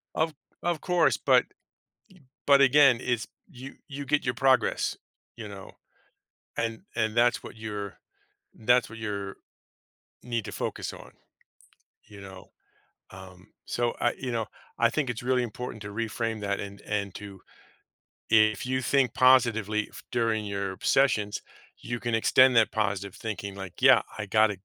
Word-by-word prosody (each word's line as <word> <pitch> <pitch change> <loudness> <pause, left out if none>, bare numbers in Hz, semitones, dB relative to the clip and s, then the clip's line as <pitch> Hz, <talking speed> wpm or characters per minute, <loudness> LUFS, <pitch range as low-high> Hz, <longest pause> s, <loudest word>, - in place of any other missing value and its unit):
Of 160 0 0 0.3
of 175 -3 -1
course 180 -2 +2
but - - +4 1.0
but 140 -1 +7
again, 140 -2 +6
it's 120 -3 -1 0.2
you 130 +2 -10
you 140 0 -6
get 145 +2 +1
your 125 - +1
progress, 130 0 +2 0.4
you 110 - -7
know, 100 -2 -10 0.9
and 115 -1 -2
and 110 -1 0
that's 120 +1 +3
what - - -10
your 105 -2 -6 0.6
that's 120 +1 +2
what 115 - -9
your 100 -2 -4 0.9
need 115 -3 -3
to - - -7
focus - - -4
on, - - -12 1.0
you 105 -2 -12
know? 95 -1 -11 0.6
Um, 95 -1 -13 0.2
so, 120 -1 0
uh, 120 - +2
you 130 -2 -4
know, 115 -2 -1 0.3
I 115 0 +4
think 140 -2 -1
it's 120 0 -5
really 125 0 +1
important 120 -1 -6
to 100 - -7
reframe 115 0 -3
that 100 -1 -1
and 100 0 -8
and 100 -2 -2
to 100 -2 -10 0.9
if 110 +1 +4
you 130 0 -1
think 130 -3 +2
positively 115 -5 +3
f - - -12
during 115 -3 0
your 100 -2 -3
sessions, 105 -7 +2 0.4
you 120 0 -5
can 120 -1 -1
extend 130 +3 +5
that 110 -1 +4
positive 100 -3 -2
thinking 100 -3 -5
like, 95 -2 -9
"Yeah, - - +7 0.2
I 105 - -4
got 110 +1 +4
115 Hz, 150 wpm, -27 LUFS, 105-125 Hz, 1.0 s, but